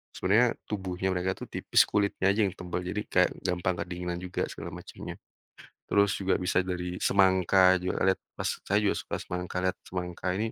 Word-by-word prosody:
sebenernya 105 +6 +4 0.2
tubuhnya 95 -2 -2
mereka 90 +1 0
itu - - -7
tipis - - +4
kulitnya 100 -1 +2
aja 110 +2 +1
yang 95 - -5
tebal 90 0 -4
jadi 105 +3 -2
kayak - - +3 0.2
gampang 90 0 0
kedinginan 90 -1 -4
juga 90 0 -2
segala - - -7
macamnya, - - -8 0.7
terus 100 -1 +4
juga 95 -1 +1
bisa 90 0 +2
dari 90 0 -3
semangka 95 -1 +5
juga 90 - -2
lihat 95 - +3 0.2
pas - - -1 0.2
saya 105 +2 +3
juga 100 - +2
suka - - -4
semangka, 90 0 -4
lihat 95 0 0
semangka 90 0 -4
ini, 110 +1 -1
95 Hz, 175 wpm, -28 LUFS, 90-100 Hz, 0.7 s, semangka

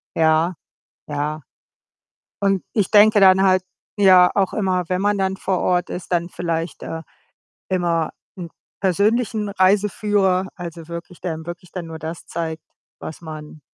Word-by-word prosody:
Ja, 160 +2 +3 0.5
ja. 150 +1 -2 1.0
Und 195 -2 +1
ich 205 -4 +1
denke 215 0 +7
dann 190 0 +6
halt 185 -1 +4 0.3
ja, 185 -3 +7
auch 195 -2 +1
immer, 185 -3 0
wenn 185 +1 0
man 205 0 +2
dann 190 0 0
vor 190 -2 -1
Ort 180 0 +1
ist, 180 0 -7
dann 170 -1 +1
vielleicht, 165 -1 -3
äh, 165 0 -5 0.7
immer 170 -3 0 0.3
'n 170 -2 -6 0.3
persönlichen 210 +3 +1
Reiseführer, 195 -1 +2
also, 170 -2 -8
wirklich 170 +1 -8
der 175 - -2
einem 160 0 -8
wirklich 175 +1 -8
dann 180 -2 -5
nur 160 -1 -8
das 160 +1 -7
zeigt, 160 -2 -4 0.4
was 160 - -8
man 155 -1 -9
180 Hz, 150 wpm, -21 LUFS, 165-195 Hz, 1.0 s, denke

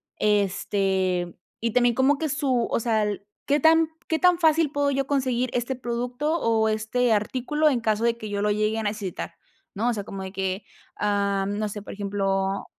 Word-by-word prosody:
Este 190 -3 0 0.3
y 230 0 0
también 245 -1 +4
como 265 +4 +3
que 315 - -1
su 265 -5 0
o - - +2
sea, 225 -2 +1
el 205 -1 -3 0.2
¿qué 290 +1 +2
tan 320 +2 +5 0.2
qué 320 - +1
tan 360 -1 +4
fácil 320 -2 +3
puedo 285 -1 +1
yo 275 -1 0
conseguir 255 -3 0
este 245 +2 -1
producto 245 +6 -2
o 225 -3 +2
este 220 +2 +1
artículo 260 +8 +1
en 250 -5 0
caso 220 0 0
de 235 0 +2
que 220 -2 -7
yo 200 0 -2
lo 210 - +1
llegue 215 +1 0
a - - -3
necesitar, 205 -3 -4 0.4
no? 225 +5 +1
O 240 - +1
sea, 205 - -4
como 195 -1 -6
de 190 - -6
que, 190 0 -3 0.3
am 200 -1 0
no 215 -1 -1
sé, 205 0 -6
por - - -8
ejemplo 195 -1 -1
225 Hz, 195 wpm, -25 LUFS, 205-260 Hz, 0.4 s, tan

